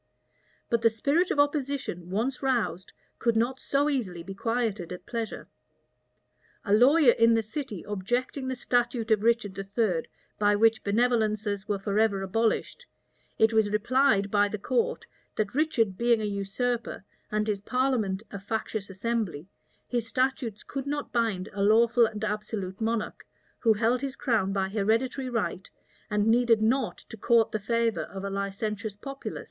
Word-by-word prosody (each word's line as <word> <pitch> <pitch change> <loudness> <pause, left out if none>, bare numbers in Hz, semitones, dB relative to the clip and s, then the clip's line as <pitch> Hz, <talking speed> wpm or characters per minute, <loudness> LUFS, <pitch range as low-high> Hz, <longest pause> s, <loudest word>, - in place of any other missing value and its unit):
But 235 -1 +1
the 230 - +5
spirit 280 - +1
of - - 0
opposition, 280 - -1
once 230 +8 -1
roused, 245 -8 -1 0.3
could 235 -1 +1
not 245 +4 +1
so 280 +1 +1
easily 205 - -2
be 195 +3 -7
quieted 220 -4 -2
at 180 +1 -8
pleasure. 230 -2 -5 1.2
A 200 - +1
lawyer 260 +5 +6
in 230 0 +4
the 225 - +1
city 220 - -6
objecting 245 +7 -2
the 260 - -2
statute 240 -2 0
of 215 -2 +4
Richard 225 -3 +1
III., 195 -3 -1 0.3
by 205 0 +4
which 220 +1 +3
benevolences 215 -2 +1
were 205 -2 0
forever 200 0 +1
abolished, 225 - -1 0.5
it 220 +1 +4
was 220 -2 +3
replied 210 -1 +2
by 205 0 +4
the 215 - -4
court, 240 +4 -1 0.3
that 210 -2 -1
Richard 235 -10 +1
being 235 -1 +3
a 215 - -2
usurper, 205 +4 -2 0.3
and 210 0 0
his 205 -2 -1
parliament 225 -5 0
a 200 - -6
factious 220 0 -4
assembly, 195 -5 -3 0.4
his 240 -2 -2
statutes 255 -3 -1
could 275 0 -5
not 290 0 -3
bind 220 -6 0
a 200 - -3
lawful 230 +3 +5
and 215 -1 -7
absolute 210 -2 -4
monarch, 225 -1 -2 0.4
who 225 -2 +4
held 230 +3 +1
his 275 -1 -3
crown 220 -8 0
by 195 -1 0
hereditary 225 +6 0
right, 210 -5 -2 0.4
and 210 0 +1
needed 230 -1 +4
not 245 +2 +1
to 225 - -12
court 230 +1 +3
the 215 - -1
favor 230 +1 0
of 195 -1 -8
a 200 - -3
licentious 200 +1 -3
populace. 275 +5 -7
225 Hz, 155 wpm, -27 LUFS, 205-245 Hz, 1.2 s, lawyer